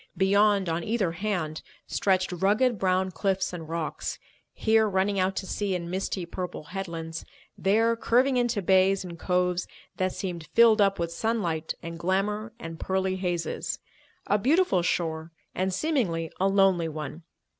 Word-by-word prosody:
Beyond, 200 0 +3
on 165 +1 -1
either 210 -5 0
hand, 170 -4 -2 0.2
stretched 185 -2 +1
rugged 205 +6 +2
brown 185 0 +1
cliffs 190 0 -1
and 165 -3 -7
rocks, 165 -1 -3 0.3
here 220 -1 +3
running 195 +1 +1
out 190 +1 +1
to 195 - -3
sea 195 0 -1
in 170 -1 -4
misty 190 -1 -2
purple 180 -1 -5
headlands, 165 -4 -5 0.3
there 225 +4 +2
curving 255 +4 +2
into 240 -5 +1
bays 190 +1 +4
and 170 -2 -8
coves 180 0 0 0.3
that 185 0 +1
seemed 175 -4 -5
filled 230 -2 +6
up 195 -1 +3
with 170 -1 -2
sunlight 170 -6 -1
and 165 0 -6
glamour 210 +4 -1
and 165 0 -8
pearly 190 0 0
hazes; 175 -2 -2 0.5
a 205 - +2
beautiful 285 - +3
shore 165 -2 -1 0.2
and, 190 +1 0
seemingly, 185 - 0
a 190 - +3
lonely 195 -4 +3
one. 155 +1 -6
190 Hz, 150 wpm, -27 LUFS, 170-205 Hz, 0.5 s, filled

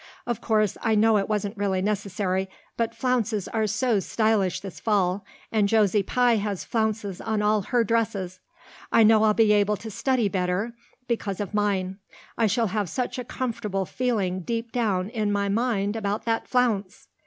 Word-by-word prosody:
Of 240 -3 -3
course 215 -3 +1
I 225 -2 +2
know 220 +1 +4
it 195 - -3
wasn't 210 0 -1
really 195 -2 0
necessary, 195 -1 -1 0.3
but 230 -1 -1
flounces 230 -6 0
are 220 -1 0
so 215 +1 +1
stylish 210 -2 +1
this 195 -2 -8
fall 200 -3 +1 0.3
and 210 -2 +2
Josie 210 -2 +3
Pye 245 +3 +2
has 205 -2 -2
flounces 215 -4 -2
on 220 -1 -1
all 210 0 +3
her 235 +4 +1
dresses. 200 -5 -1 0.5
I 225 - +6
know 220 0 +6
I'll 215 -1 +4
be 220 -2 +5
able 210 0 +2
to 220 +1 -8
study 240 +2 +1
better 190 +4 -1 0.3
because 215 -5 -2
of 205 0 -4
mine. 195 -2 0 0.4
I 230 - +2
shall 225 +1 +1
have 205 -5 -1
such 250 +3 -3
a - - -3
comfortable 215 -6 -3
feeling 205 -6 -1
deep 230 +4 -3
down 205 -6 0
in 215 -3 -1
my 200 0 0
mind 205 -2 0
about 205 -1 -2
that 225 -1 -1
flounce." 225 -7 0
210 Hz, 175 wpm, -25 LUFS, 195-225 Hz, 0.5 s, I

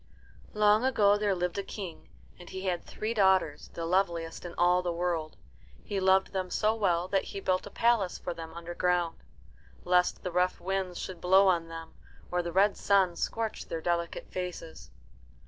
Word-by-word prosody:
Long 210 +1 +4
ago 215 -6 +4
there 205 -2 +1
lived 180 +1 -2
a - - -2
King, 190 -5 -8 0.3
and 175 - -12
he 190 - -6
had 180 -2 -1
three 220 +2 -4
daughters, 190 -7 +2
the 165 - -3
loveliest 170 -2 0
in 175 - -7
all 180 +1 +3
the 180 -1 -2
world. 170 -2 -2 0.5
He 200 -2 -3
loved 190 0 +3
them 185 -1 -2
so 215 +4 +1
well 180 -5 +1
that 195 -1 +1
he 200 - -6
built 185 0 0
a - - -8
palace 230 -5 +1
for 175 - -5
them 165 -1 -8
underground, 175 0 -1 0.6
lest 180 0 +2
the 180 - -3
rough 180 +1 +1
winds 190 -1 -2
should 185 -3 -6
blow 190 +2 +5
on 170 -3 +2
them 165 0 -9 0.4
or 180 0 +1
the 170 0 -4
red 195 +3 +3
sun 190 -3 +3
scorch 225 +3 -3
their 165 - -3
delicate 170 0 -2
faces. 180 -3 -6
180 Hz, 180 wpm, -29 LUFS, 170-195 Hz, 0.6 s, blow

